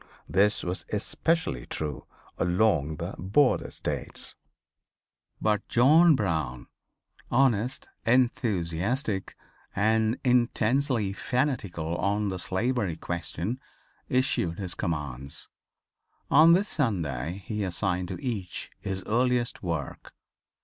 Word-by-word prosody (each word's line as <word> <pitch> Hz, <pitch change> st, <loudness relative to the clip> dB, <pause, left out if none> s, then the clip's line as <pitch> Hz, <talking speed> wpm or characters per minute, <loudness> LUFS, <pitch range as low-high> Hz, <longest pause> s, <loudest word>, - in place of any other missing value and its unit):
This 100 Hz, +7 st, +2 dB
was 90 Hz, +1 st, -3 dB
especially 110 Hz, -, -1 dB
true 75 Hz, -2 st, -4 dB, 0.3 s
along 85 Hz, -4 st, +2 dB
the 85 Hz, +4 st, -5 dB
border 110 Hz, +10 st, +2 dB
states. -, -, -5 dB, 1.1 s
But 105 Hz, -1 st, 0 dB
John 155 Hz, +7 st, +6 dB
Brown 80 Hz, -, -1 dB, 0.6 s
honest, 125 Hz, -1 st, +2 dB, 0.2 s
enthusiastic 110 Hz, -, 0 dB, 0.4 s
and 110 Hz, +3 st, +2 dB
intensely 125 Hz, -2 st, +2 dB
fanatical 100 Hz, -, -1 dB
on 100 Hz, +2 st, 0 dB
the 95 Hz, -1 st, -4 dB
slavery 100 Hz, 0 st, 0 dB
question 85 Hz, +7 st, -3 dB, 0.5 s
issued 125 Hz, -10 st, +1 dB
his 95 Hz, -4 st, -4 dB
commands. 70 Hz, -, -4 dB, 0.8 s
On 160 Hz, +3 st, +8 dB
this 195 Hz, +4 st, +3 dB
Sunday 85 Hz, -, -2 dB
he 105 Hz, +1 st, -2 dB
assigned 90 Hz, -1 st, -1 dB
to -, -, -5 dB
each 110 Hz, -, -4 dB
his 95 Hz, -1 st, -4 dB
earliest 120 Hz, +1 st, +1 dB
work. 85 Hz, -6 st, -4 dB
105 Hz, 95 wpm, -27 LUFS, 85-125 Hz, 1.1 s, On